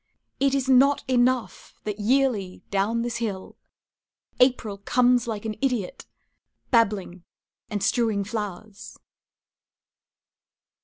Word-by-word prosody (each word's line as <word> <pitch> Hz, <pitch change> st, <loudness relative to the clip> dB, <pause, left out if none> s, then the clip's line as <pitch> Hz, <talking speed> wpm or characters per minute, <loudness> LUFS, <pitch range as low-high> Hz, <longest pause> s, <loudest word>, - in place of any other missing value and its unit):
It 275 Hz, 0 st, +2 dB
is 270 Hz, -1 st, -1 dB
not 270 Hz, +2 st, +4 dB
enough 255 Hz, -1 st, 0 dB
that 210 Hz, -1 st, -4 dB
yearly, 220 Hz, -5 st, 0 dB
down 210 Hz, +4 st, 0 dB
this 240 Hz, -1 st, -3 dB
hill, 205 Hz, -5 st, -5 dB, 0.8 s
April 245 Hz, -5 st, +2 dB
Comes 245 Hz, +3 st, +2 dB
like 220 Hz, -2 st, -4 dB
an 220 Hz, -, -2 dB
idiot, 250 Hz, -5 st, -2 dB, 0.6 s
babbling 205 Hz, -7 st, +1 dB, 0.5 s
and 205 Hz, -3 st, -3 dB
strewing 220 Hz, -1 st, +1 dB
flowers. 210 Hz, 0 st, -7 dB
230 Hz, 100 wpm, -25 LUFS, 205-250 Hz, 0.8 s, not